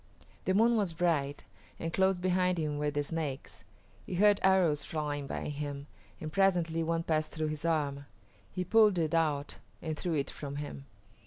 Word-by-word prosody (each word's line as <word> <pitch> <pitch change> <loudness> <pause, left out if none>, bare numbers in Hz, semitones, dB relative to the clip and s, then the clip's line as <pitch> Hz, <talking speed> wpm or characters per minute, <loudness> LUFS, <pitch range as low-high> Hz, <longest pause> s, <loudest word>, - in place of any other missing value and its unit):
The 190 - +2
moon 230 +3 +4
was 195 -6 0
bright, 150 -5 0 0.3
and 165 0 -4
close 190 0 +3
behind 180 0 +1
him 150 -2 -1
were 150 0 +1
the 145 0 -1
Snakes. 150 -3 -5 0.4
He - - -5
heard 205 +2 +5
arrows 180 -6 +3
flying 145 -2 -3
by - - -4
him, 145 -1 -5 0.3
and 155 0 -6
presently 175 -4 +2
one 165 0 0
passed 155 -2 0
through 155 -1 -1
his 155 +1 -5
arm. 145 -4 0 0.4
He 185 - -2
pulled 210 0 +5
it 160 -2 0
out 150 -3 0 0.2
and 160 -2 -3
threw 165 +2 -2
it 140 -2 -1
from 140 -1 -6
him. 140 - -6
160 Hz, 175 wpm, -31 LUFS, 145-180 Hz, 0.4 s, heard